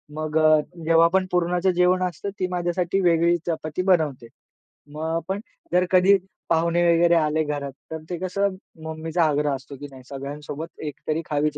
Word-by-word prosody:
मग 155 Hz, 0 st, -2 dB
अ, 155 Hz, 0 st, +5 dB, 0.3 s
जेव्हा 165 Hz, 0 st, +5 dB
आपण 185 Hz, +3 st, +2 dB
पुरणाचं 180 Hz, +1 st, +1 dB
जेवण 180 Hz, +1 st, +3 dB
असतं, 180 Hz, +2 st, -3 dB
ती 185 Hz, -, 0 dB
माझ्यासाठी 175 Hz, +1 st, -1 dB
वेगळी 170 Hz, -1 st, +3 dB
चपाती 155 Hz, 0 st, -2 dB
बनवते. 155 Hz, -10 st, +1 dB, 0.7 s
मग 155 Hz, +1 st, -5 dB
आपण 180 Hz, +4 st, -3 dB, 0.3 s
जर 180 Hz, +1 st, +4 dB
कधी 190 Hz, +2 st, +6 dB, 0.3 s
पाहुणे 170 Hz, +1 st, +2 dB
वगैरे 170 Hz, +1 st, +4 dB
आले 155 Hz, -1 st, +2 dB
घरात. 145 Hz, -2 st, -4 dB, 0.2 s
तर 160 Hz, -, -3 dB
ते 175 Hz, -, -3 dB
कसं 190 Hz, +2 st, -1 dB, 0.3 s
मम्मीचा 160 Hz, +2 st, -1 dB
आग्रह 150 Hz, -2 st, +1 dB
असतो, 135 Hz, +1 st, -10 dB
की 145 Hz, +2 st, -8 dB
नाही, 130 Hz, -1 st, -13 dB
सगळ्यांसोबत 145 Hz, +3 st, -7 dB
एकतरी 155 Hz, +3 st, -3 dB
खावीच 150 Hz, 0 st, 0 dB
165 Hz, 160 wpm, -24 LUFS, 150-180 Hz, 0.7 s, कधी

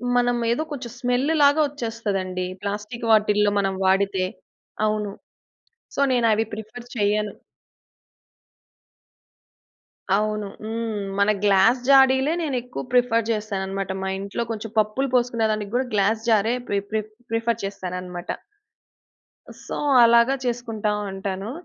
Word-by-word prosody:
మనం 245 Hz, 0 st, +2 dB
ఏదో 305 Hz, +7 st, 0 dB
కొంచెం 245 Hz, -5 st, -6 dB
స్మెల్ 250 Hz, +3 st, +1 dB
లాగా 285 Hz, +2 st, +5 dB
వచ్చేస్తదండి 210 Hz, -9 st, -3 dB, 0.2 s
ప్లాస్టిక్ 210 Hz, +4 st, -4 dB
వాటిల్లో 210 Hz, -1 st, +4 dB
మనం 195 Hz, -1 st, 0 dB
వాడితే. 190 Hz, 0 st, +2 dB, 0.6 s
అవును. 210 Hz, -1 st, -1 dB, 0.8 s
సో 280 Hz, -, 0 dB
నేను 240 Hz, -2 st, +2 dB
అవి 220 Hz, +1 st, +2 dB
ప్రిఫర్ 220 Hz, +3 st, -8 dB
చెయ్యను. 210 Hz, -1 st, +1 dB, 2.8 s
అవును. 210 Hz, 0 st, -1 dB, 0.2 s
హ్మ్. 220 Hz, -1 st, -3 dB, 0.2 s
మన 200 Hz, +1 st, +4 dB
గ్లాస్ 205 Hz, +5 st, +4 dB
జా‌డిలే 265 Hz, +2 st, +5 dB
నేనెక్కువ 250 Hz, -4 st, -3 dB
ప్రిఫర్ 230 Hz, -2 st, +3 dB
చేస్తానన్నమాట. 195 Hz, -3 st, -2 dB
మా 190 Hz, -, -2 dB
ఇంట్లో 200 Hz, +4 st, -3 dB
కొంచెం 220 Hz, 0 st, -6 dB
పప్పులు 215 Hz, +5 st, +1 dB
పోసుకునే 235 Hz, -2 st, +2 dB
దానికి 210 Hz, 0 st, -4 dB
గూడా 255 Hz, +1 st, +1 dB
గ్లాస్ 215 Hz, +3 st, +1 dB
జారే 220 Hz, +2 st, +3 dB
ప్రి 200 Hz, -, +1 dB
ప్రి 215 Hz, -1 st, +1 dB, 0.3 s
ప్రిఫర్ 230 Hz, -1 st, 0 dB
చేస్తానన్నమాట. 180 Hz, -2 st, -5 dB, 1.4 s
సో, -, -, -4 dB, 0.3 s
అలాగా 235 Hz, +3 st, +5 dB
చేసుకుంటా 230 Hz, -3 st, -2 dB, 0.2 s
ఉంటాను. 195 Hz, +2 st, -4 dB
220 Hz, 115 wpm, -23 LUFS, 200-240 Hz, 2.8 s, లాగా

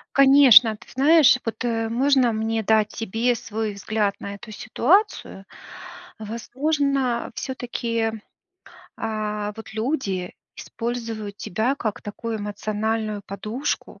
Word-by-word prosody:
Конечно. 270 Hz, -5 st, +7 dB
Ты -, -, -18 dB
знаешь, 280 Hz, 0 st, +5 dB
вот, 225 Hz, +2 st, -4 dB
э, 225 Hz, -1 st, -1 dB
можно 255 Hz, 0 st, +3 dB
мне 220 Hz, +1 st, -1 dB
дать 215 Hz, 0 st, +2 dB
тебе 225 Hz, +3 st, -1 dB
свой 220 Hz, -2 st, -4 dB
взгляд 205 Hz, 0 st, -1 dB
на 200 Hz, 0 st, -6 dB
эту 220 Hz, +2 st, -11 dB
ситуацию? 240 Hz, -, 0 dB, 0.7 s
Возможно, 260 Hz, +3 st, -1 dB
всё-таки, 235 Hz, -3 st, -2 dB, 0.9 s
а, 210 Hz, -1 st, -3 dB
вот 220 Hz, 0 st, -10 dB
люди 220 Hz, -7 st, -2 dB, 0.2 s
используют 225 Hz, -3 st, -5 dB
тебя 220 Hz, +8 st, -1 dB
как 215 Hz, -6 st, -4 dB
такую 220 Hz, +2 st, -5 dB
эмоциональную 215 Hz, +1 st, -2 dB
подушку, 215 Hz, +8 st, -4 dB
225 Hz, 105 wpm, -23 LUFS, 215-250 Hz, 0.9 s, Конечно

